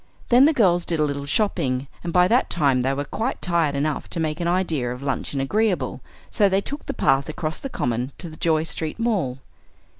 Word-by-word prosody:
Then 250 Hz, +3 st, +7 dB
the 310 Hz, -, +5 dB
girls 185 Hz, -, +3 dB
did 165 Hz, -2 st, -2 dB
a -, -, +4 dB
little 140 Hz, -1 st, -2 dB
shopping; 140 Hz, -, 0 dB, 0.2 s
and 170 Hz, -, -3 dB
by 180 Hz, +1 st, +5 dB
that 245 Hz, +6 st, +2 dB
time 140 Hz, -6 st, +2 dB
they 130 Hz, +2 st, +1 dB
were 140 Hz, +1 st, -2 dB
quite 230 Hz, -, -3 dB
tired 170 Hz, -5 st, +1 dB
enough 145 Hz, +1 st, -2 dB
to -, -, -3 dB
make 155 Hz, 0 st, -1 dB
the 170 Hz, -, -1 dB
idea 165 Hz, -9 st, 0 dB
of 125 Hz, +2 st, -7 dB
luncheon 140 Hz, 0 st, -2 dB
agreeable, 200 Hz, +8 st, 0 dB, 0.3 s
so 205 Hz, -2 st, +3 dB
they 190 Hz, +1 st, +2 dB
took 285 Hz, +8 st, -6 dB
the -, -, -2 dB
path 135 Hz, +2 st, +2 dB
across 155 Hz, 0 st, -4 dB
the 275 Hz, -, -5 dB
Common 125 Hz, -, -2 dB
to 180 Hz, -, -4 dB
the 155 Hz, -, -10 dB
Joy 160 Hz, -1 st, +2 dB
Street 160 Hz, -1 st, -4 dB
Mall. 200 Hz, -, 0 dB
160 Hz, 215 wpm, -23 LUFS, 140-190 Hz, 0.3 s, Then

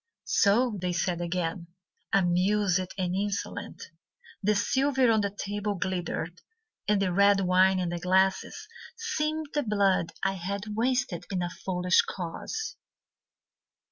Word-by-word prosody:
"So..." 215 Hz, +1 st, +3 dB
they 180 Hz, -1 st, -1 dB
said 175 Hz, 0 st, -1 dB
again, 170 Hz, 0 st, -2 dB, 0.4 s
Amused 185 Hz, 0 st, +2 dB
and 180 Hz, -2 st, -1 dB
insolent. 205 Hz, +1 st, -3 dB, 0.6 s
The 210 Hz, +1 st, +2 dB
silver 265 Hz, +3 st, +2 dB
on 220 Hz, -1 st, +3 dB
the 200 Hz, -, 0 dB
table 205 Hz, +1 st, -3 dB
glittered, 175 Hz, -1 st, -3 dB, 0.5 s
And 210 Hz, -1 st, +3 dB
the 185 Hz, -2 st, 0 dB
red 200 Hz, +1 st, +5 dB
wine 185 Hz, +1 st, +4 dB
in 180 Hz, -2 st, -1 dB
the 175 Hz, 0 st, -3 dB
glasses 190 Hz, -, +1 dB, 0.3 s
Seemed 315 Hz, -9 st, -2 dB
the 295 Hz, -, +1 dB
blood 200 Hz, -, +1 dB
I 195 Hz, -, +2 dB
had 195 Hz, +2 st, -4 dB
wasted 245 Hz, -5 st, 0 dB
In 185 Hz, -2 st, -1 dB
a 175 Hz, -, -3 dB
foolish 180 Hz, -1 st, +2 dB
cause. 195 Hz, -, -5 dB
195 Hz, 130 wpm, -28 LUFS, 180-210 Hz, 0.6 s, red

